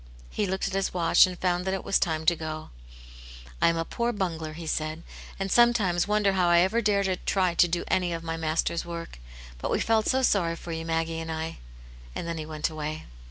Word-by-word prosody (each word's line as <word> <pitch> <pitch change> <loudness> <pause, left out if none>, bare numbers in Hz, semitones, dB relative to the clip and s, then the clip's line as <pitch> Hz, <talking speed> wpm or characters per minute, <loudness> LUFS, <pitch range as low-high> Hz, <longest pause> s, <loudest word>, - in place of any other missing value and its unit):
He 205 - -1
looked 190 +1 -1
at - - -5
his 195 -1 -1
watch, 170 +1 +5
and 180 -1 -6
found 180 -1 0
that 190 0 0
it 190 - -5
was - - +2
time 160 -2 -1
to 170 - +4
go. 155 -1 -6 0.9
I - - +5
am 165 0 +2
a 165 - -1
poor 235 +6 -1
bungler," 165 -7 -3
he 165 +1 -8
said, 155 +1 -2 0.2
" - - -15
and 195 0 -2
sometimes 215 -8 +4
wonder 210 -1 +2
how 180 -2 +2
I 170 - +5
ever 215 +6 +2
dare 205 -2 +2
to 190 -1 0
try 185 -2 +1
to 175 - +4
do 170 +1 -1
any 180 -2 +1
of 165 -1 -4
my 165 0 -3
Master's 165 +1 -1
work. 170 - -7 0.4
But - - -3
we - - +1
felt 220 -1 +2
so 265 0 +2
sorry 175 -8 +2
for 170 - -8
you, 165 0 -4
Maggie 165 0 -1
and 165 0 -5
I." 160 0 -4 0.6
And - - -4
then 165 -1 -3
he 155 - -5
went 155 -1 -2
away. 155 -1 -5
170 Hz, 235 wpm, -27 LUFS, 165-190 Hz, 0.9 s, watch